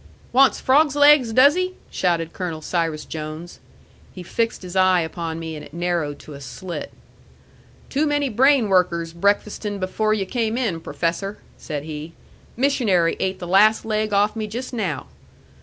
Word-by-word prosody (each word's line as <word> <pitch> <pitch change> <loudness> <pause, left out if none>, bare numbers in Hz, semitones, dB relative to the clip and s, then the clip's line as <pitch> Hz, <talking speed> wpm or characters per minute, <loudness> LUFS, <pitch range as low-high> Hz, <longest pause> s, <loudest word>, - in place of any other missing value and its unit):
"Wants 265 +1 +5
frogs' 285 +2 +3
legs, 290 -5 +6
does 260 +5 +6
he?" 365 +1 -2 0.2
shouted 170 -3 0
Colonel 165 -4 -5
Cyrus 165 -3 -2
Jones. 155 +2 -7 0.5
He 180 - -9
fixed 225 +3 -2
his 180 0 -8
eye 185 -1 +4
upon 165 0 -4
me, 160 -1 -6
and 150 - -8
it 145 - -13
narrowed 170 -4 -1
to 150 - -11
a 140 - -10
slit. 140 +8 -7 1.0
"Too 295 +3 0
many 290 -1 +1
brain 260 0 +3
workers 175 -3 +1
breakfasting 205 +3 0
before 215 +3 0
yu' 200 -2 -2
came 225 +2 -1
in, 205 -11 -1
professor," 180 +6 -3 0.2
said 150 -3 -6
he. 155 +1 -7 0.4
"Missionary 225 -11 +2
ate 190 0 -1
the 175 - -7
last 210 +4 +4
leg 215 -1 -1
off 205 +2 +2
me 215 -1 -3
just 245 +5 -6
now. 190 - -2
190 Hz, 160 wpm, -22 LUFS, 165-230 Hz, 1.0 s, legs